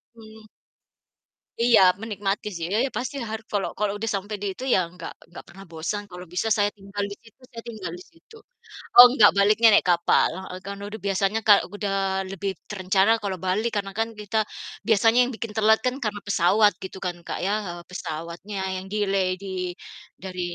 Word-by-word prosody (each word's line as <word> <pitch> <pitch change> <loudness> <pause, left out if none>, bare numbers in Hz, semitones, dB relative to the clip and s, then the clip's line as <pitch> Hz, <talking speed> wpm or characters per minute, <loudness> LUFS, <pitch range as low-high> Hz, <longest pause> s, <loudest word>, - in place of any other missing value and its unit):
mhm. 220 -1 -15 1.1
Iya, 235 -2 +5 0.2
menikmati 205 -2 -3
sih, 165 - -4
ya 215 - +2
ya, - - -3
pasti 260 +3 -4
har 220 0 -4
kalau 205 -2 0
kalau 210 -1 0
udah 225 - -2
sampai 205 +2 -3
di 205 - -3
itu 260 - -7
ya - - +4 0.2
gak 165 - -7 0.2
gak - - -9
pernah 195 +2 -13
bosan, 170 +6 -3
kalau 180 0 -9
bisa 180 +5 -1
saya 205 0 +2
tinggal 200 0 -5
di - - -5
situ, 225 +2 -21
saya 230 - -7
tinggal 195 -7 -6
di - - -12
situ. 340 +7 -20 0.6
Oh, 245 - +13
nggak, 210 -2 +8
baliknya 210 +3 +5
naik - - +4
kapal 170 0 +3 0.2
heeh, 185 - -7
karena 200 0 -6
udah 220 +1 -8
biasanya 195 +2 +1
kal 205 -2 +8 0.2
udah 205 -1 -2 0.4
lebih 195 +1 -3 0.2
terencana 190 +1 +1
kalau 195 -2 -3
balik 215 +6 0
karena 195 0 -9
kan 225 - +1
kita 210 +1 -4 0.5
biasanya 225 +2 +4
yang 250 - -4
bikin 225 -1 -6
telat 220 0 +4
kan 250 - +1
karena 210 -1 -2
pesawat 205 +3 +4
gitu 190 0 -7
kan, 175 - -3
Kak, - - -4
ya, 200 - +1 0.2
eee, 175 0 -7
pesawatnya 170 +3 -6 0.2
yang 185 - -6
delay 195 -3 +1 0.2
di 195 - -7 0.7
dari 185 -1 -6
205 Hz, 185 wpm, -24 LUFS, 190-220 Hz, 1.1 s, Oh